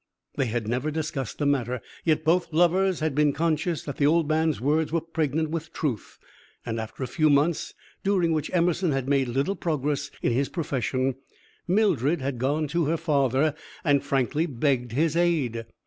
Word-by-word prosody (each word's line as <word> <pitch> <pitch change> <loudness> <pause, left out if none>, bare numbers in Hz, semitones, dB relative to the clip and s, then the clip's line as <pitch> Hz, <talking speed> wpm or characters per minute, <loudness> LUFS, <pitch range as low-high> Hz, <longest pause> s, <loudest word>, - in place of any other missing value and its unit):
They 135 -3 0
had 115 -1 -2
never 125 +6 -1
discussed 150 -5 -3
the 145 - -1
matter, 125 -3 0 0.2
yet 155 -1 +2
both 170 +2 +2
the 160 - -9
lovers 180 +1 +3
had 155 -2 0
been 150 0 +3
conscious 165 +2 0
that 145 - -6
the 145 - +3
old 165 0 +3
man's 160 0 +1
words 150 +5 +1
were 165 - +2
pregnant 160 -1 -1
with 165 -1 -4
truth, 130 - -3 0.5
and 115 0 -3
after 110 +4 -6
a - - -2
few 155 +5 +2
months, 145 +3 +1 0.3
during 185 -4 +2
which 155 -2 -1
Emerson 175 -1 +1
had 135 -1 -2
made 135 -2 +2
little 135 +11 0
progress 150 -3 -1
in - - +2
his 135 +4 0
profession, 135 -5 -1 0.5
Mildred 175 - +2
had 130 -2 -3
gone 145 +4 0
to 170 +1 +1
her 165 +3 +1
father 145 -2 +2 0.3
and 145 -3 +3
frankly 140 +4 0
begged 125 -3 0
his 155 +5 +1
aid. 140 -10 +1
150 Hz, 180 wpm, -26 LUFS, 135-165 Hz, 0.5 s, lovers